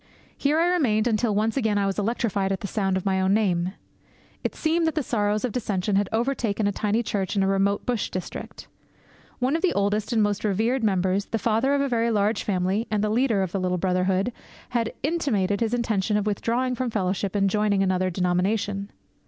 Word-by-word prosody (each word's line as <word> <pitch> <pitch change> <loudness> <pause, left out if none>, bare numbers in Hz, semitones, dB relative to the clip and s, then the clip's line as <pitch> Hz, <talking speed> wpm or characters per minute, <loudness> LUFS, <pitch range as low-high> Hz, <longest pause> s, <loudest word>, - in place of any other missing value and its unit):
Here 290 +2 +1
I 330 - +3
remained 270 -12 +2
until 220 -2 +1
once 220 +2 +1
again 220 -6 +1
I 200 - +1
was 195 +1 -1
electrified 205 -3 0
at 190 - -2
the 200 - -3
sound 195 -2 0
of 190 - -5
my 190 -1 +1
own 190 +1 +3
name. 185 -4 +1 0.7
It - - -2
seemed 325 +1 +1
that 320 - -1
the 305 - 0
sorrows 210 -2 0
of 250 - -2
dissension 205 -4 -1
had 200 0 +1
overtaken 225 -3 0
a 205 - +2
tiny 215 +3 0
church 200 -3 -2
in 195 - +2
a - - +2
remote 195 +1 +1
bush 240 -4 -1
district. 185 -1 -7 0.7
One 260 +4 +1
of 330 - -1
the 370 - +2
oldest 205 +2 0
and 225 -3 +3
most 205 -1 -1
revered 225 +5 +1
members, 190 -1 +1
the 225 - -2
father 230 +6 +1
of 280 - +1
a 280 - +1
very 235 -2 +1
large 210 -1 +1
family 195 +3 0
and 210 -1 0
the 210 - +1
leader 225 -4 +2
of 185 - -3
the 195 - -1
little 180 0 0
brotherhood, 185 +4 0 0.4
had 230 -2 -1
intimated 230 - 0
his 225 -1 0
intention 215 -3 0
of 210 - -1
withdrawing 235 +5 0
from 255 0 -2
fellowship 195 -2 -1
and 200 -1 +2
of 195 - +1
joining 210 -2 +2
another 185 -1 +1
denomination. 195 +3 0
210 Hz, 210 wpm, -25 LUFS, 195-235 Hz, 0.7 s, I